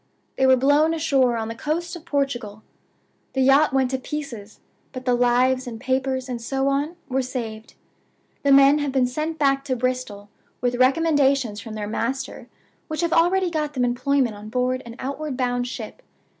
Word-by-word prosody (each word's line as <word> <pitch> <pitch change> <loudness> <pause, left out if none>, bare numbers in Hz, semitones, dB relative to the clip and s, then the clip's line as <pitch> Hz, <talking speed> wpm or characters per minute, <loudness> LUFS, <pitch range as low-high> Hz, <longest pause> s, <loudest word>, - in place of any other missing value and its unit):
They 265 - +3
were 260 - +7
blown 290 +5 +3
ashore 270 -7 +2
on 220 -1 -3
the 225 - -4
coast 335 +8 -3
of 340 -1 -11
Portugal. 245 -9 -2 0.7
The 265 - 0
yacht 275 +3 +5
went 265 -1 +1
to 265 - -1
pieces, 250 -8 -7 0.3
but 255 -1 -7
the 250 - +2
lives, 250 +1 +2
and 225 -2 -6
papers, 260 0 -1
and 245 -2 -5
so 270 +3 0
on, 290 +5 -1
were 265 0 0
saved. 225 -4 -6 0.7
The 280 - +2
men 275 +2 +7
have 290 -2 -1
been 260 -1 +2
sent 305 +6 -3
back 275 -2 +2
to 260 -2 -1
Bristol, 235 -5 -3 0.3
with 245 0 0
recommendations 270 -4 +2
from 225 -2 -8
their 210 -1 -4
master 260 +5 -3 0.4
which 310 0 -3
have 340 -1 0
already 355 +2 +3
got 305 -2 -2
them 250 -1 +1
employment 245 0 +1
on 210 +1 -10
board 255 +2 0
an 230 - -9
outward 280 0 -4
bound 245 -1 0
ship. 380 - -7
265 Hz, 180 wpm, -23 LUFS, 245-285 Hz, 0.7 s, were